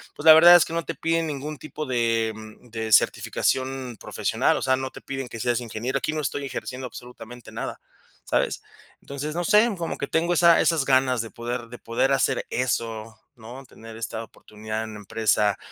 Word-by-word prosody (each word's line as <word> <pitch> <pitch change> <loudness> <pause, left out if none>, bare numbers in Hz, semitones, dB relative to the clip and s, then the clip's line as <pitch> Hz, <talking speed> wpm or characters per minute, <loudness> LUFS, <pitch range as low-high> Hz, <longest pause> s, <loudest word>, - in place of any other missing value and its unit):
pues, 145 - -9
la 160 - +12
verdad 170 +2 +9
es 175 - +7
que - - -8
no 170 0 -2
te - - -3
piden 165 0 0
ningún 150 +1 -5
tipo 155 +1 -7
de 115 -3 0
mm, 110 +2 -13
de, 110 -1 -4
certificación 130 +2 +1
profesional, - - 0
o - - -4
sea, 130 - +2
no 130 0 -4
te - - -11
piden 135 -1 -5
que 115 - -8
seas 120 0 0
ingeniero, 120 +3 -3
aquí 155 - -2
no 155 - -2
estoy 140 0 -3
ejerciendo 130 -1 -6
absolutamente 120 -1 -11
nada, - - -6 0.4
¿sabes? - - 0 0.4
Entonces, 140 +2 -5
no 175 - -1
sé, 210 +6 +5
como 170 -1 -4
que - - -3
tengo 170 +2 +1
esa 170 0 +6
esas 160 -5 +2
ganas 130 -3 +3
de 115 - -8
poder 120 +1 -4
de 120 - -10
poder 115 +4 0
hacer 135 - +1
eso, 115 -3 -2 0.2
¿no? 120 +3 -11
Tener 115 -2 -13
esta 115 0 -5
oportunidad 110 0 -7
en 110 -1 -8
la - - -8
empresa, 105 0 +1
125 Hz, 200 wpm, -24 LUFS, 115-145 Hz, 0.4 s, la